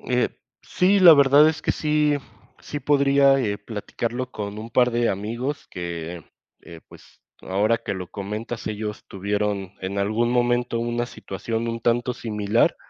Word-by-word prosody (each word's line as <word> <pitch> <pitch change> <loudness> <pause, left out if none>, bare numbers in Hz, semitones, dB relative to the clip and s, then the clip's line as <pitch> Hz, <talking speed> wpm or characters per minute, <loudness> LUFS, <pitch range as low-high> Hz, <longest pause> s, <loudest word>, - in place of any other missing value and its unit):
Eh, 125 -1 0 0.3
sí, 190 +3 +2
la 175 -3 +10
verdad 140 +1 +6
es 155 0 -3
que - - +1
sí, 150 -1 +1 0.5
sí 145 - -6
podría, 140 -1 +4
eh, 105 -6 -1
platicarlo 115 +4 -4
con 105 -2 -6
un 110 +2 -8
par 125 +1 +3
de 120 0 +1
amigos 115 +9 -3
que, 85 -2 -6 0.4
eh, 85 -1 -12
pues, - - -18 0.2
ahora 105 +5 +1
que - - -4
lo 90 -2 -7
comentas, 110 +3 -5
ellos 105 0 -4
tuvieron 100 -1 -2
en 95 +2 -4
algún 110 +4 +1
momento 120 -1 +1
una 120 +1 -1
situación 115 +2 -4
un 115 0 -3
tanto 120 +2 +1
similar. 105 -1 +1
115 Hz, 155 wpm, -23 LUFS, 100-125 Hz, 0.5 s, la